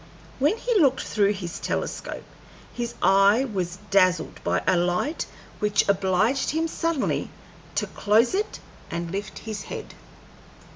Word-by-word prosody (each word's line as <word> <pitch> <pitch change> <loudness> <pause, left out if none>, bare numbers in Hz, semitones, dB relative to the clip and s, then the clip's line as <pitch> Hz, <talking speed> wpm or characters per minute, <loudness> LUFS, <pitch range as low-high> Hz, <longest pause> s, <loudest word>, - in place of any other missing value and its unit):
When 295 - +3
he 470 -2 +1
looked 265 -3 +4
through 205 -1 +2
his 175 -4 -6
telescope - - -3 0.5
his 240 -1 -4
eye 200 +6 +5
was 180 -7 -3
dazzled 185 -4 +3
by - - 0
a 185 - +4
light 180 - 0 0.3
which 210 -1 +2
obliged 200 +6 +2
him 320 +2 0
suddenly 330 -3 -1 0.5
to - - +1
close 220 - +2
it 415 +3 -1 0.3
and 170 0 -4
lift 200 +2 -4
his 215 -2 -5
head. - - -7
205 Hz, 135 wpm, -25 LUFS, 185-270 Hz, 0.5 s, eye